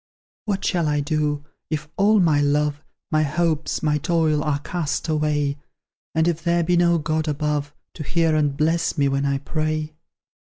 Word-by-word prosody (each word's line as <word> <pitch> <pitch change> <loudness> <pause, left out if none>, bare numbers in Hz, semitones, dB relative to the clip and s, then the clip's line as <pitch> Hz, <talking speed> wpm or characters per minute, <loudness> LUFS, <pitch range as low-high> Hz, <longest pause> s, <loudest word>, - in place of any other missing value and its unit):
What 200 -3 -2
shall 170 -4 +1
I 150 0 +1
do, 145 0 -1 0.2
if 150 -1 -3
all 210 +2 +4
my 155 -5 +3
love, 145 0 +1 0.3
My 155 -1 +3
hopes, 155 +2 0
my 150 -1 +2
toil, 155 -1 +1
are 150 -2 0
cast 155 +1 -3
away, 150 -2 0 0.6
And 160 +1 +3
if 170 -1 -1
there 170 0 +2
be 175 +2 +2
no 170 0 +4
God 155 0 -1
above, 150 -1 -1 0.2
To - - -9
hear 165 +1 +1
and 145 -2 +1
bless 165 +2 +1
me 140 -1 +3
when 140 +1 0
I 140 0 +1
pray? 155 +2 -2
155 Hz, 170 wpm, -22 LUFS, 145-165 Hz, 0.6 s, all